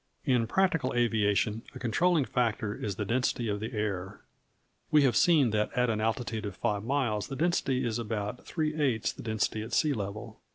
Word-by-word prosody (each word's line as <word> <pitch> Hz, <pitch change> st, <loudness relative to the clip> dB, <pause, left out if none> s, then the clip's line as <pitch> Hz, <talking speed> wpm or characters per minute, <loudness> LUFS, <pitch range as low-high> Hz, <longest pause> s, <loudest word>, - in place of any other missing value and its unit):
In 125 Hz, -3 st, +2 dB
practical 165 Hz, -8 st, +1 dB
aviation, 110 Hz, -2 st, +1 dB
a -, -, -7 dB
controlling 150 Hz, +6 st, +2 dB
factor 115 Hz, -4 st, 0 dB
is 105 Hz, -2 st, -4 dB
the 105 Hz, -, -3 dB
density 120 Hz, +1 st, 0 dB
of 105 Hz, -1 st, -1 dB
the 110 Hz, +2 st, -4 dB
air. 100 Hz, -2 st, -3 dB, 0.7 s
We 150 Hz, -1 st, +5 dB
have 125 Hz, -4 st, +3 dB
seen 150 Hz, -9 st, +4 dB
that 105 Hz, 0 st, 0 dB
at 125 Hz, -1 st, +2 dB
an 110 Hz, -1 st, -1 dB
altitude 110 Hz, -1 st, -2 dB
of 100 Hz, -, -7 dB
five 105 Hz, -3 st, -1 dB
miles 120 Hz, -5 st, 0 dB
the 135 Hz, -, -5 dB
density 135 Hz, -5 st, +1 dB
is 115 Hz, 0 st, -1 dB
about 105 Hz, 0 st, -4 dB
three 155 Hz, -2 st, -2 dB
eighths 135 Hz, -8 st, 0 dB
the -, -, -10 dB
density 110 Hz, -1 st, -1 dB
at 110 Hz, +2 st, -7 dB
sea 150 Hz, -2 st, +3 dB
level. 100 Hz, -2 st, -6 dB
115 Hz, 190 wpm, -29 LUFS, 105-130 Hz, 0.7 s, We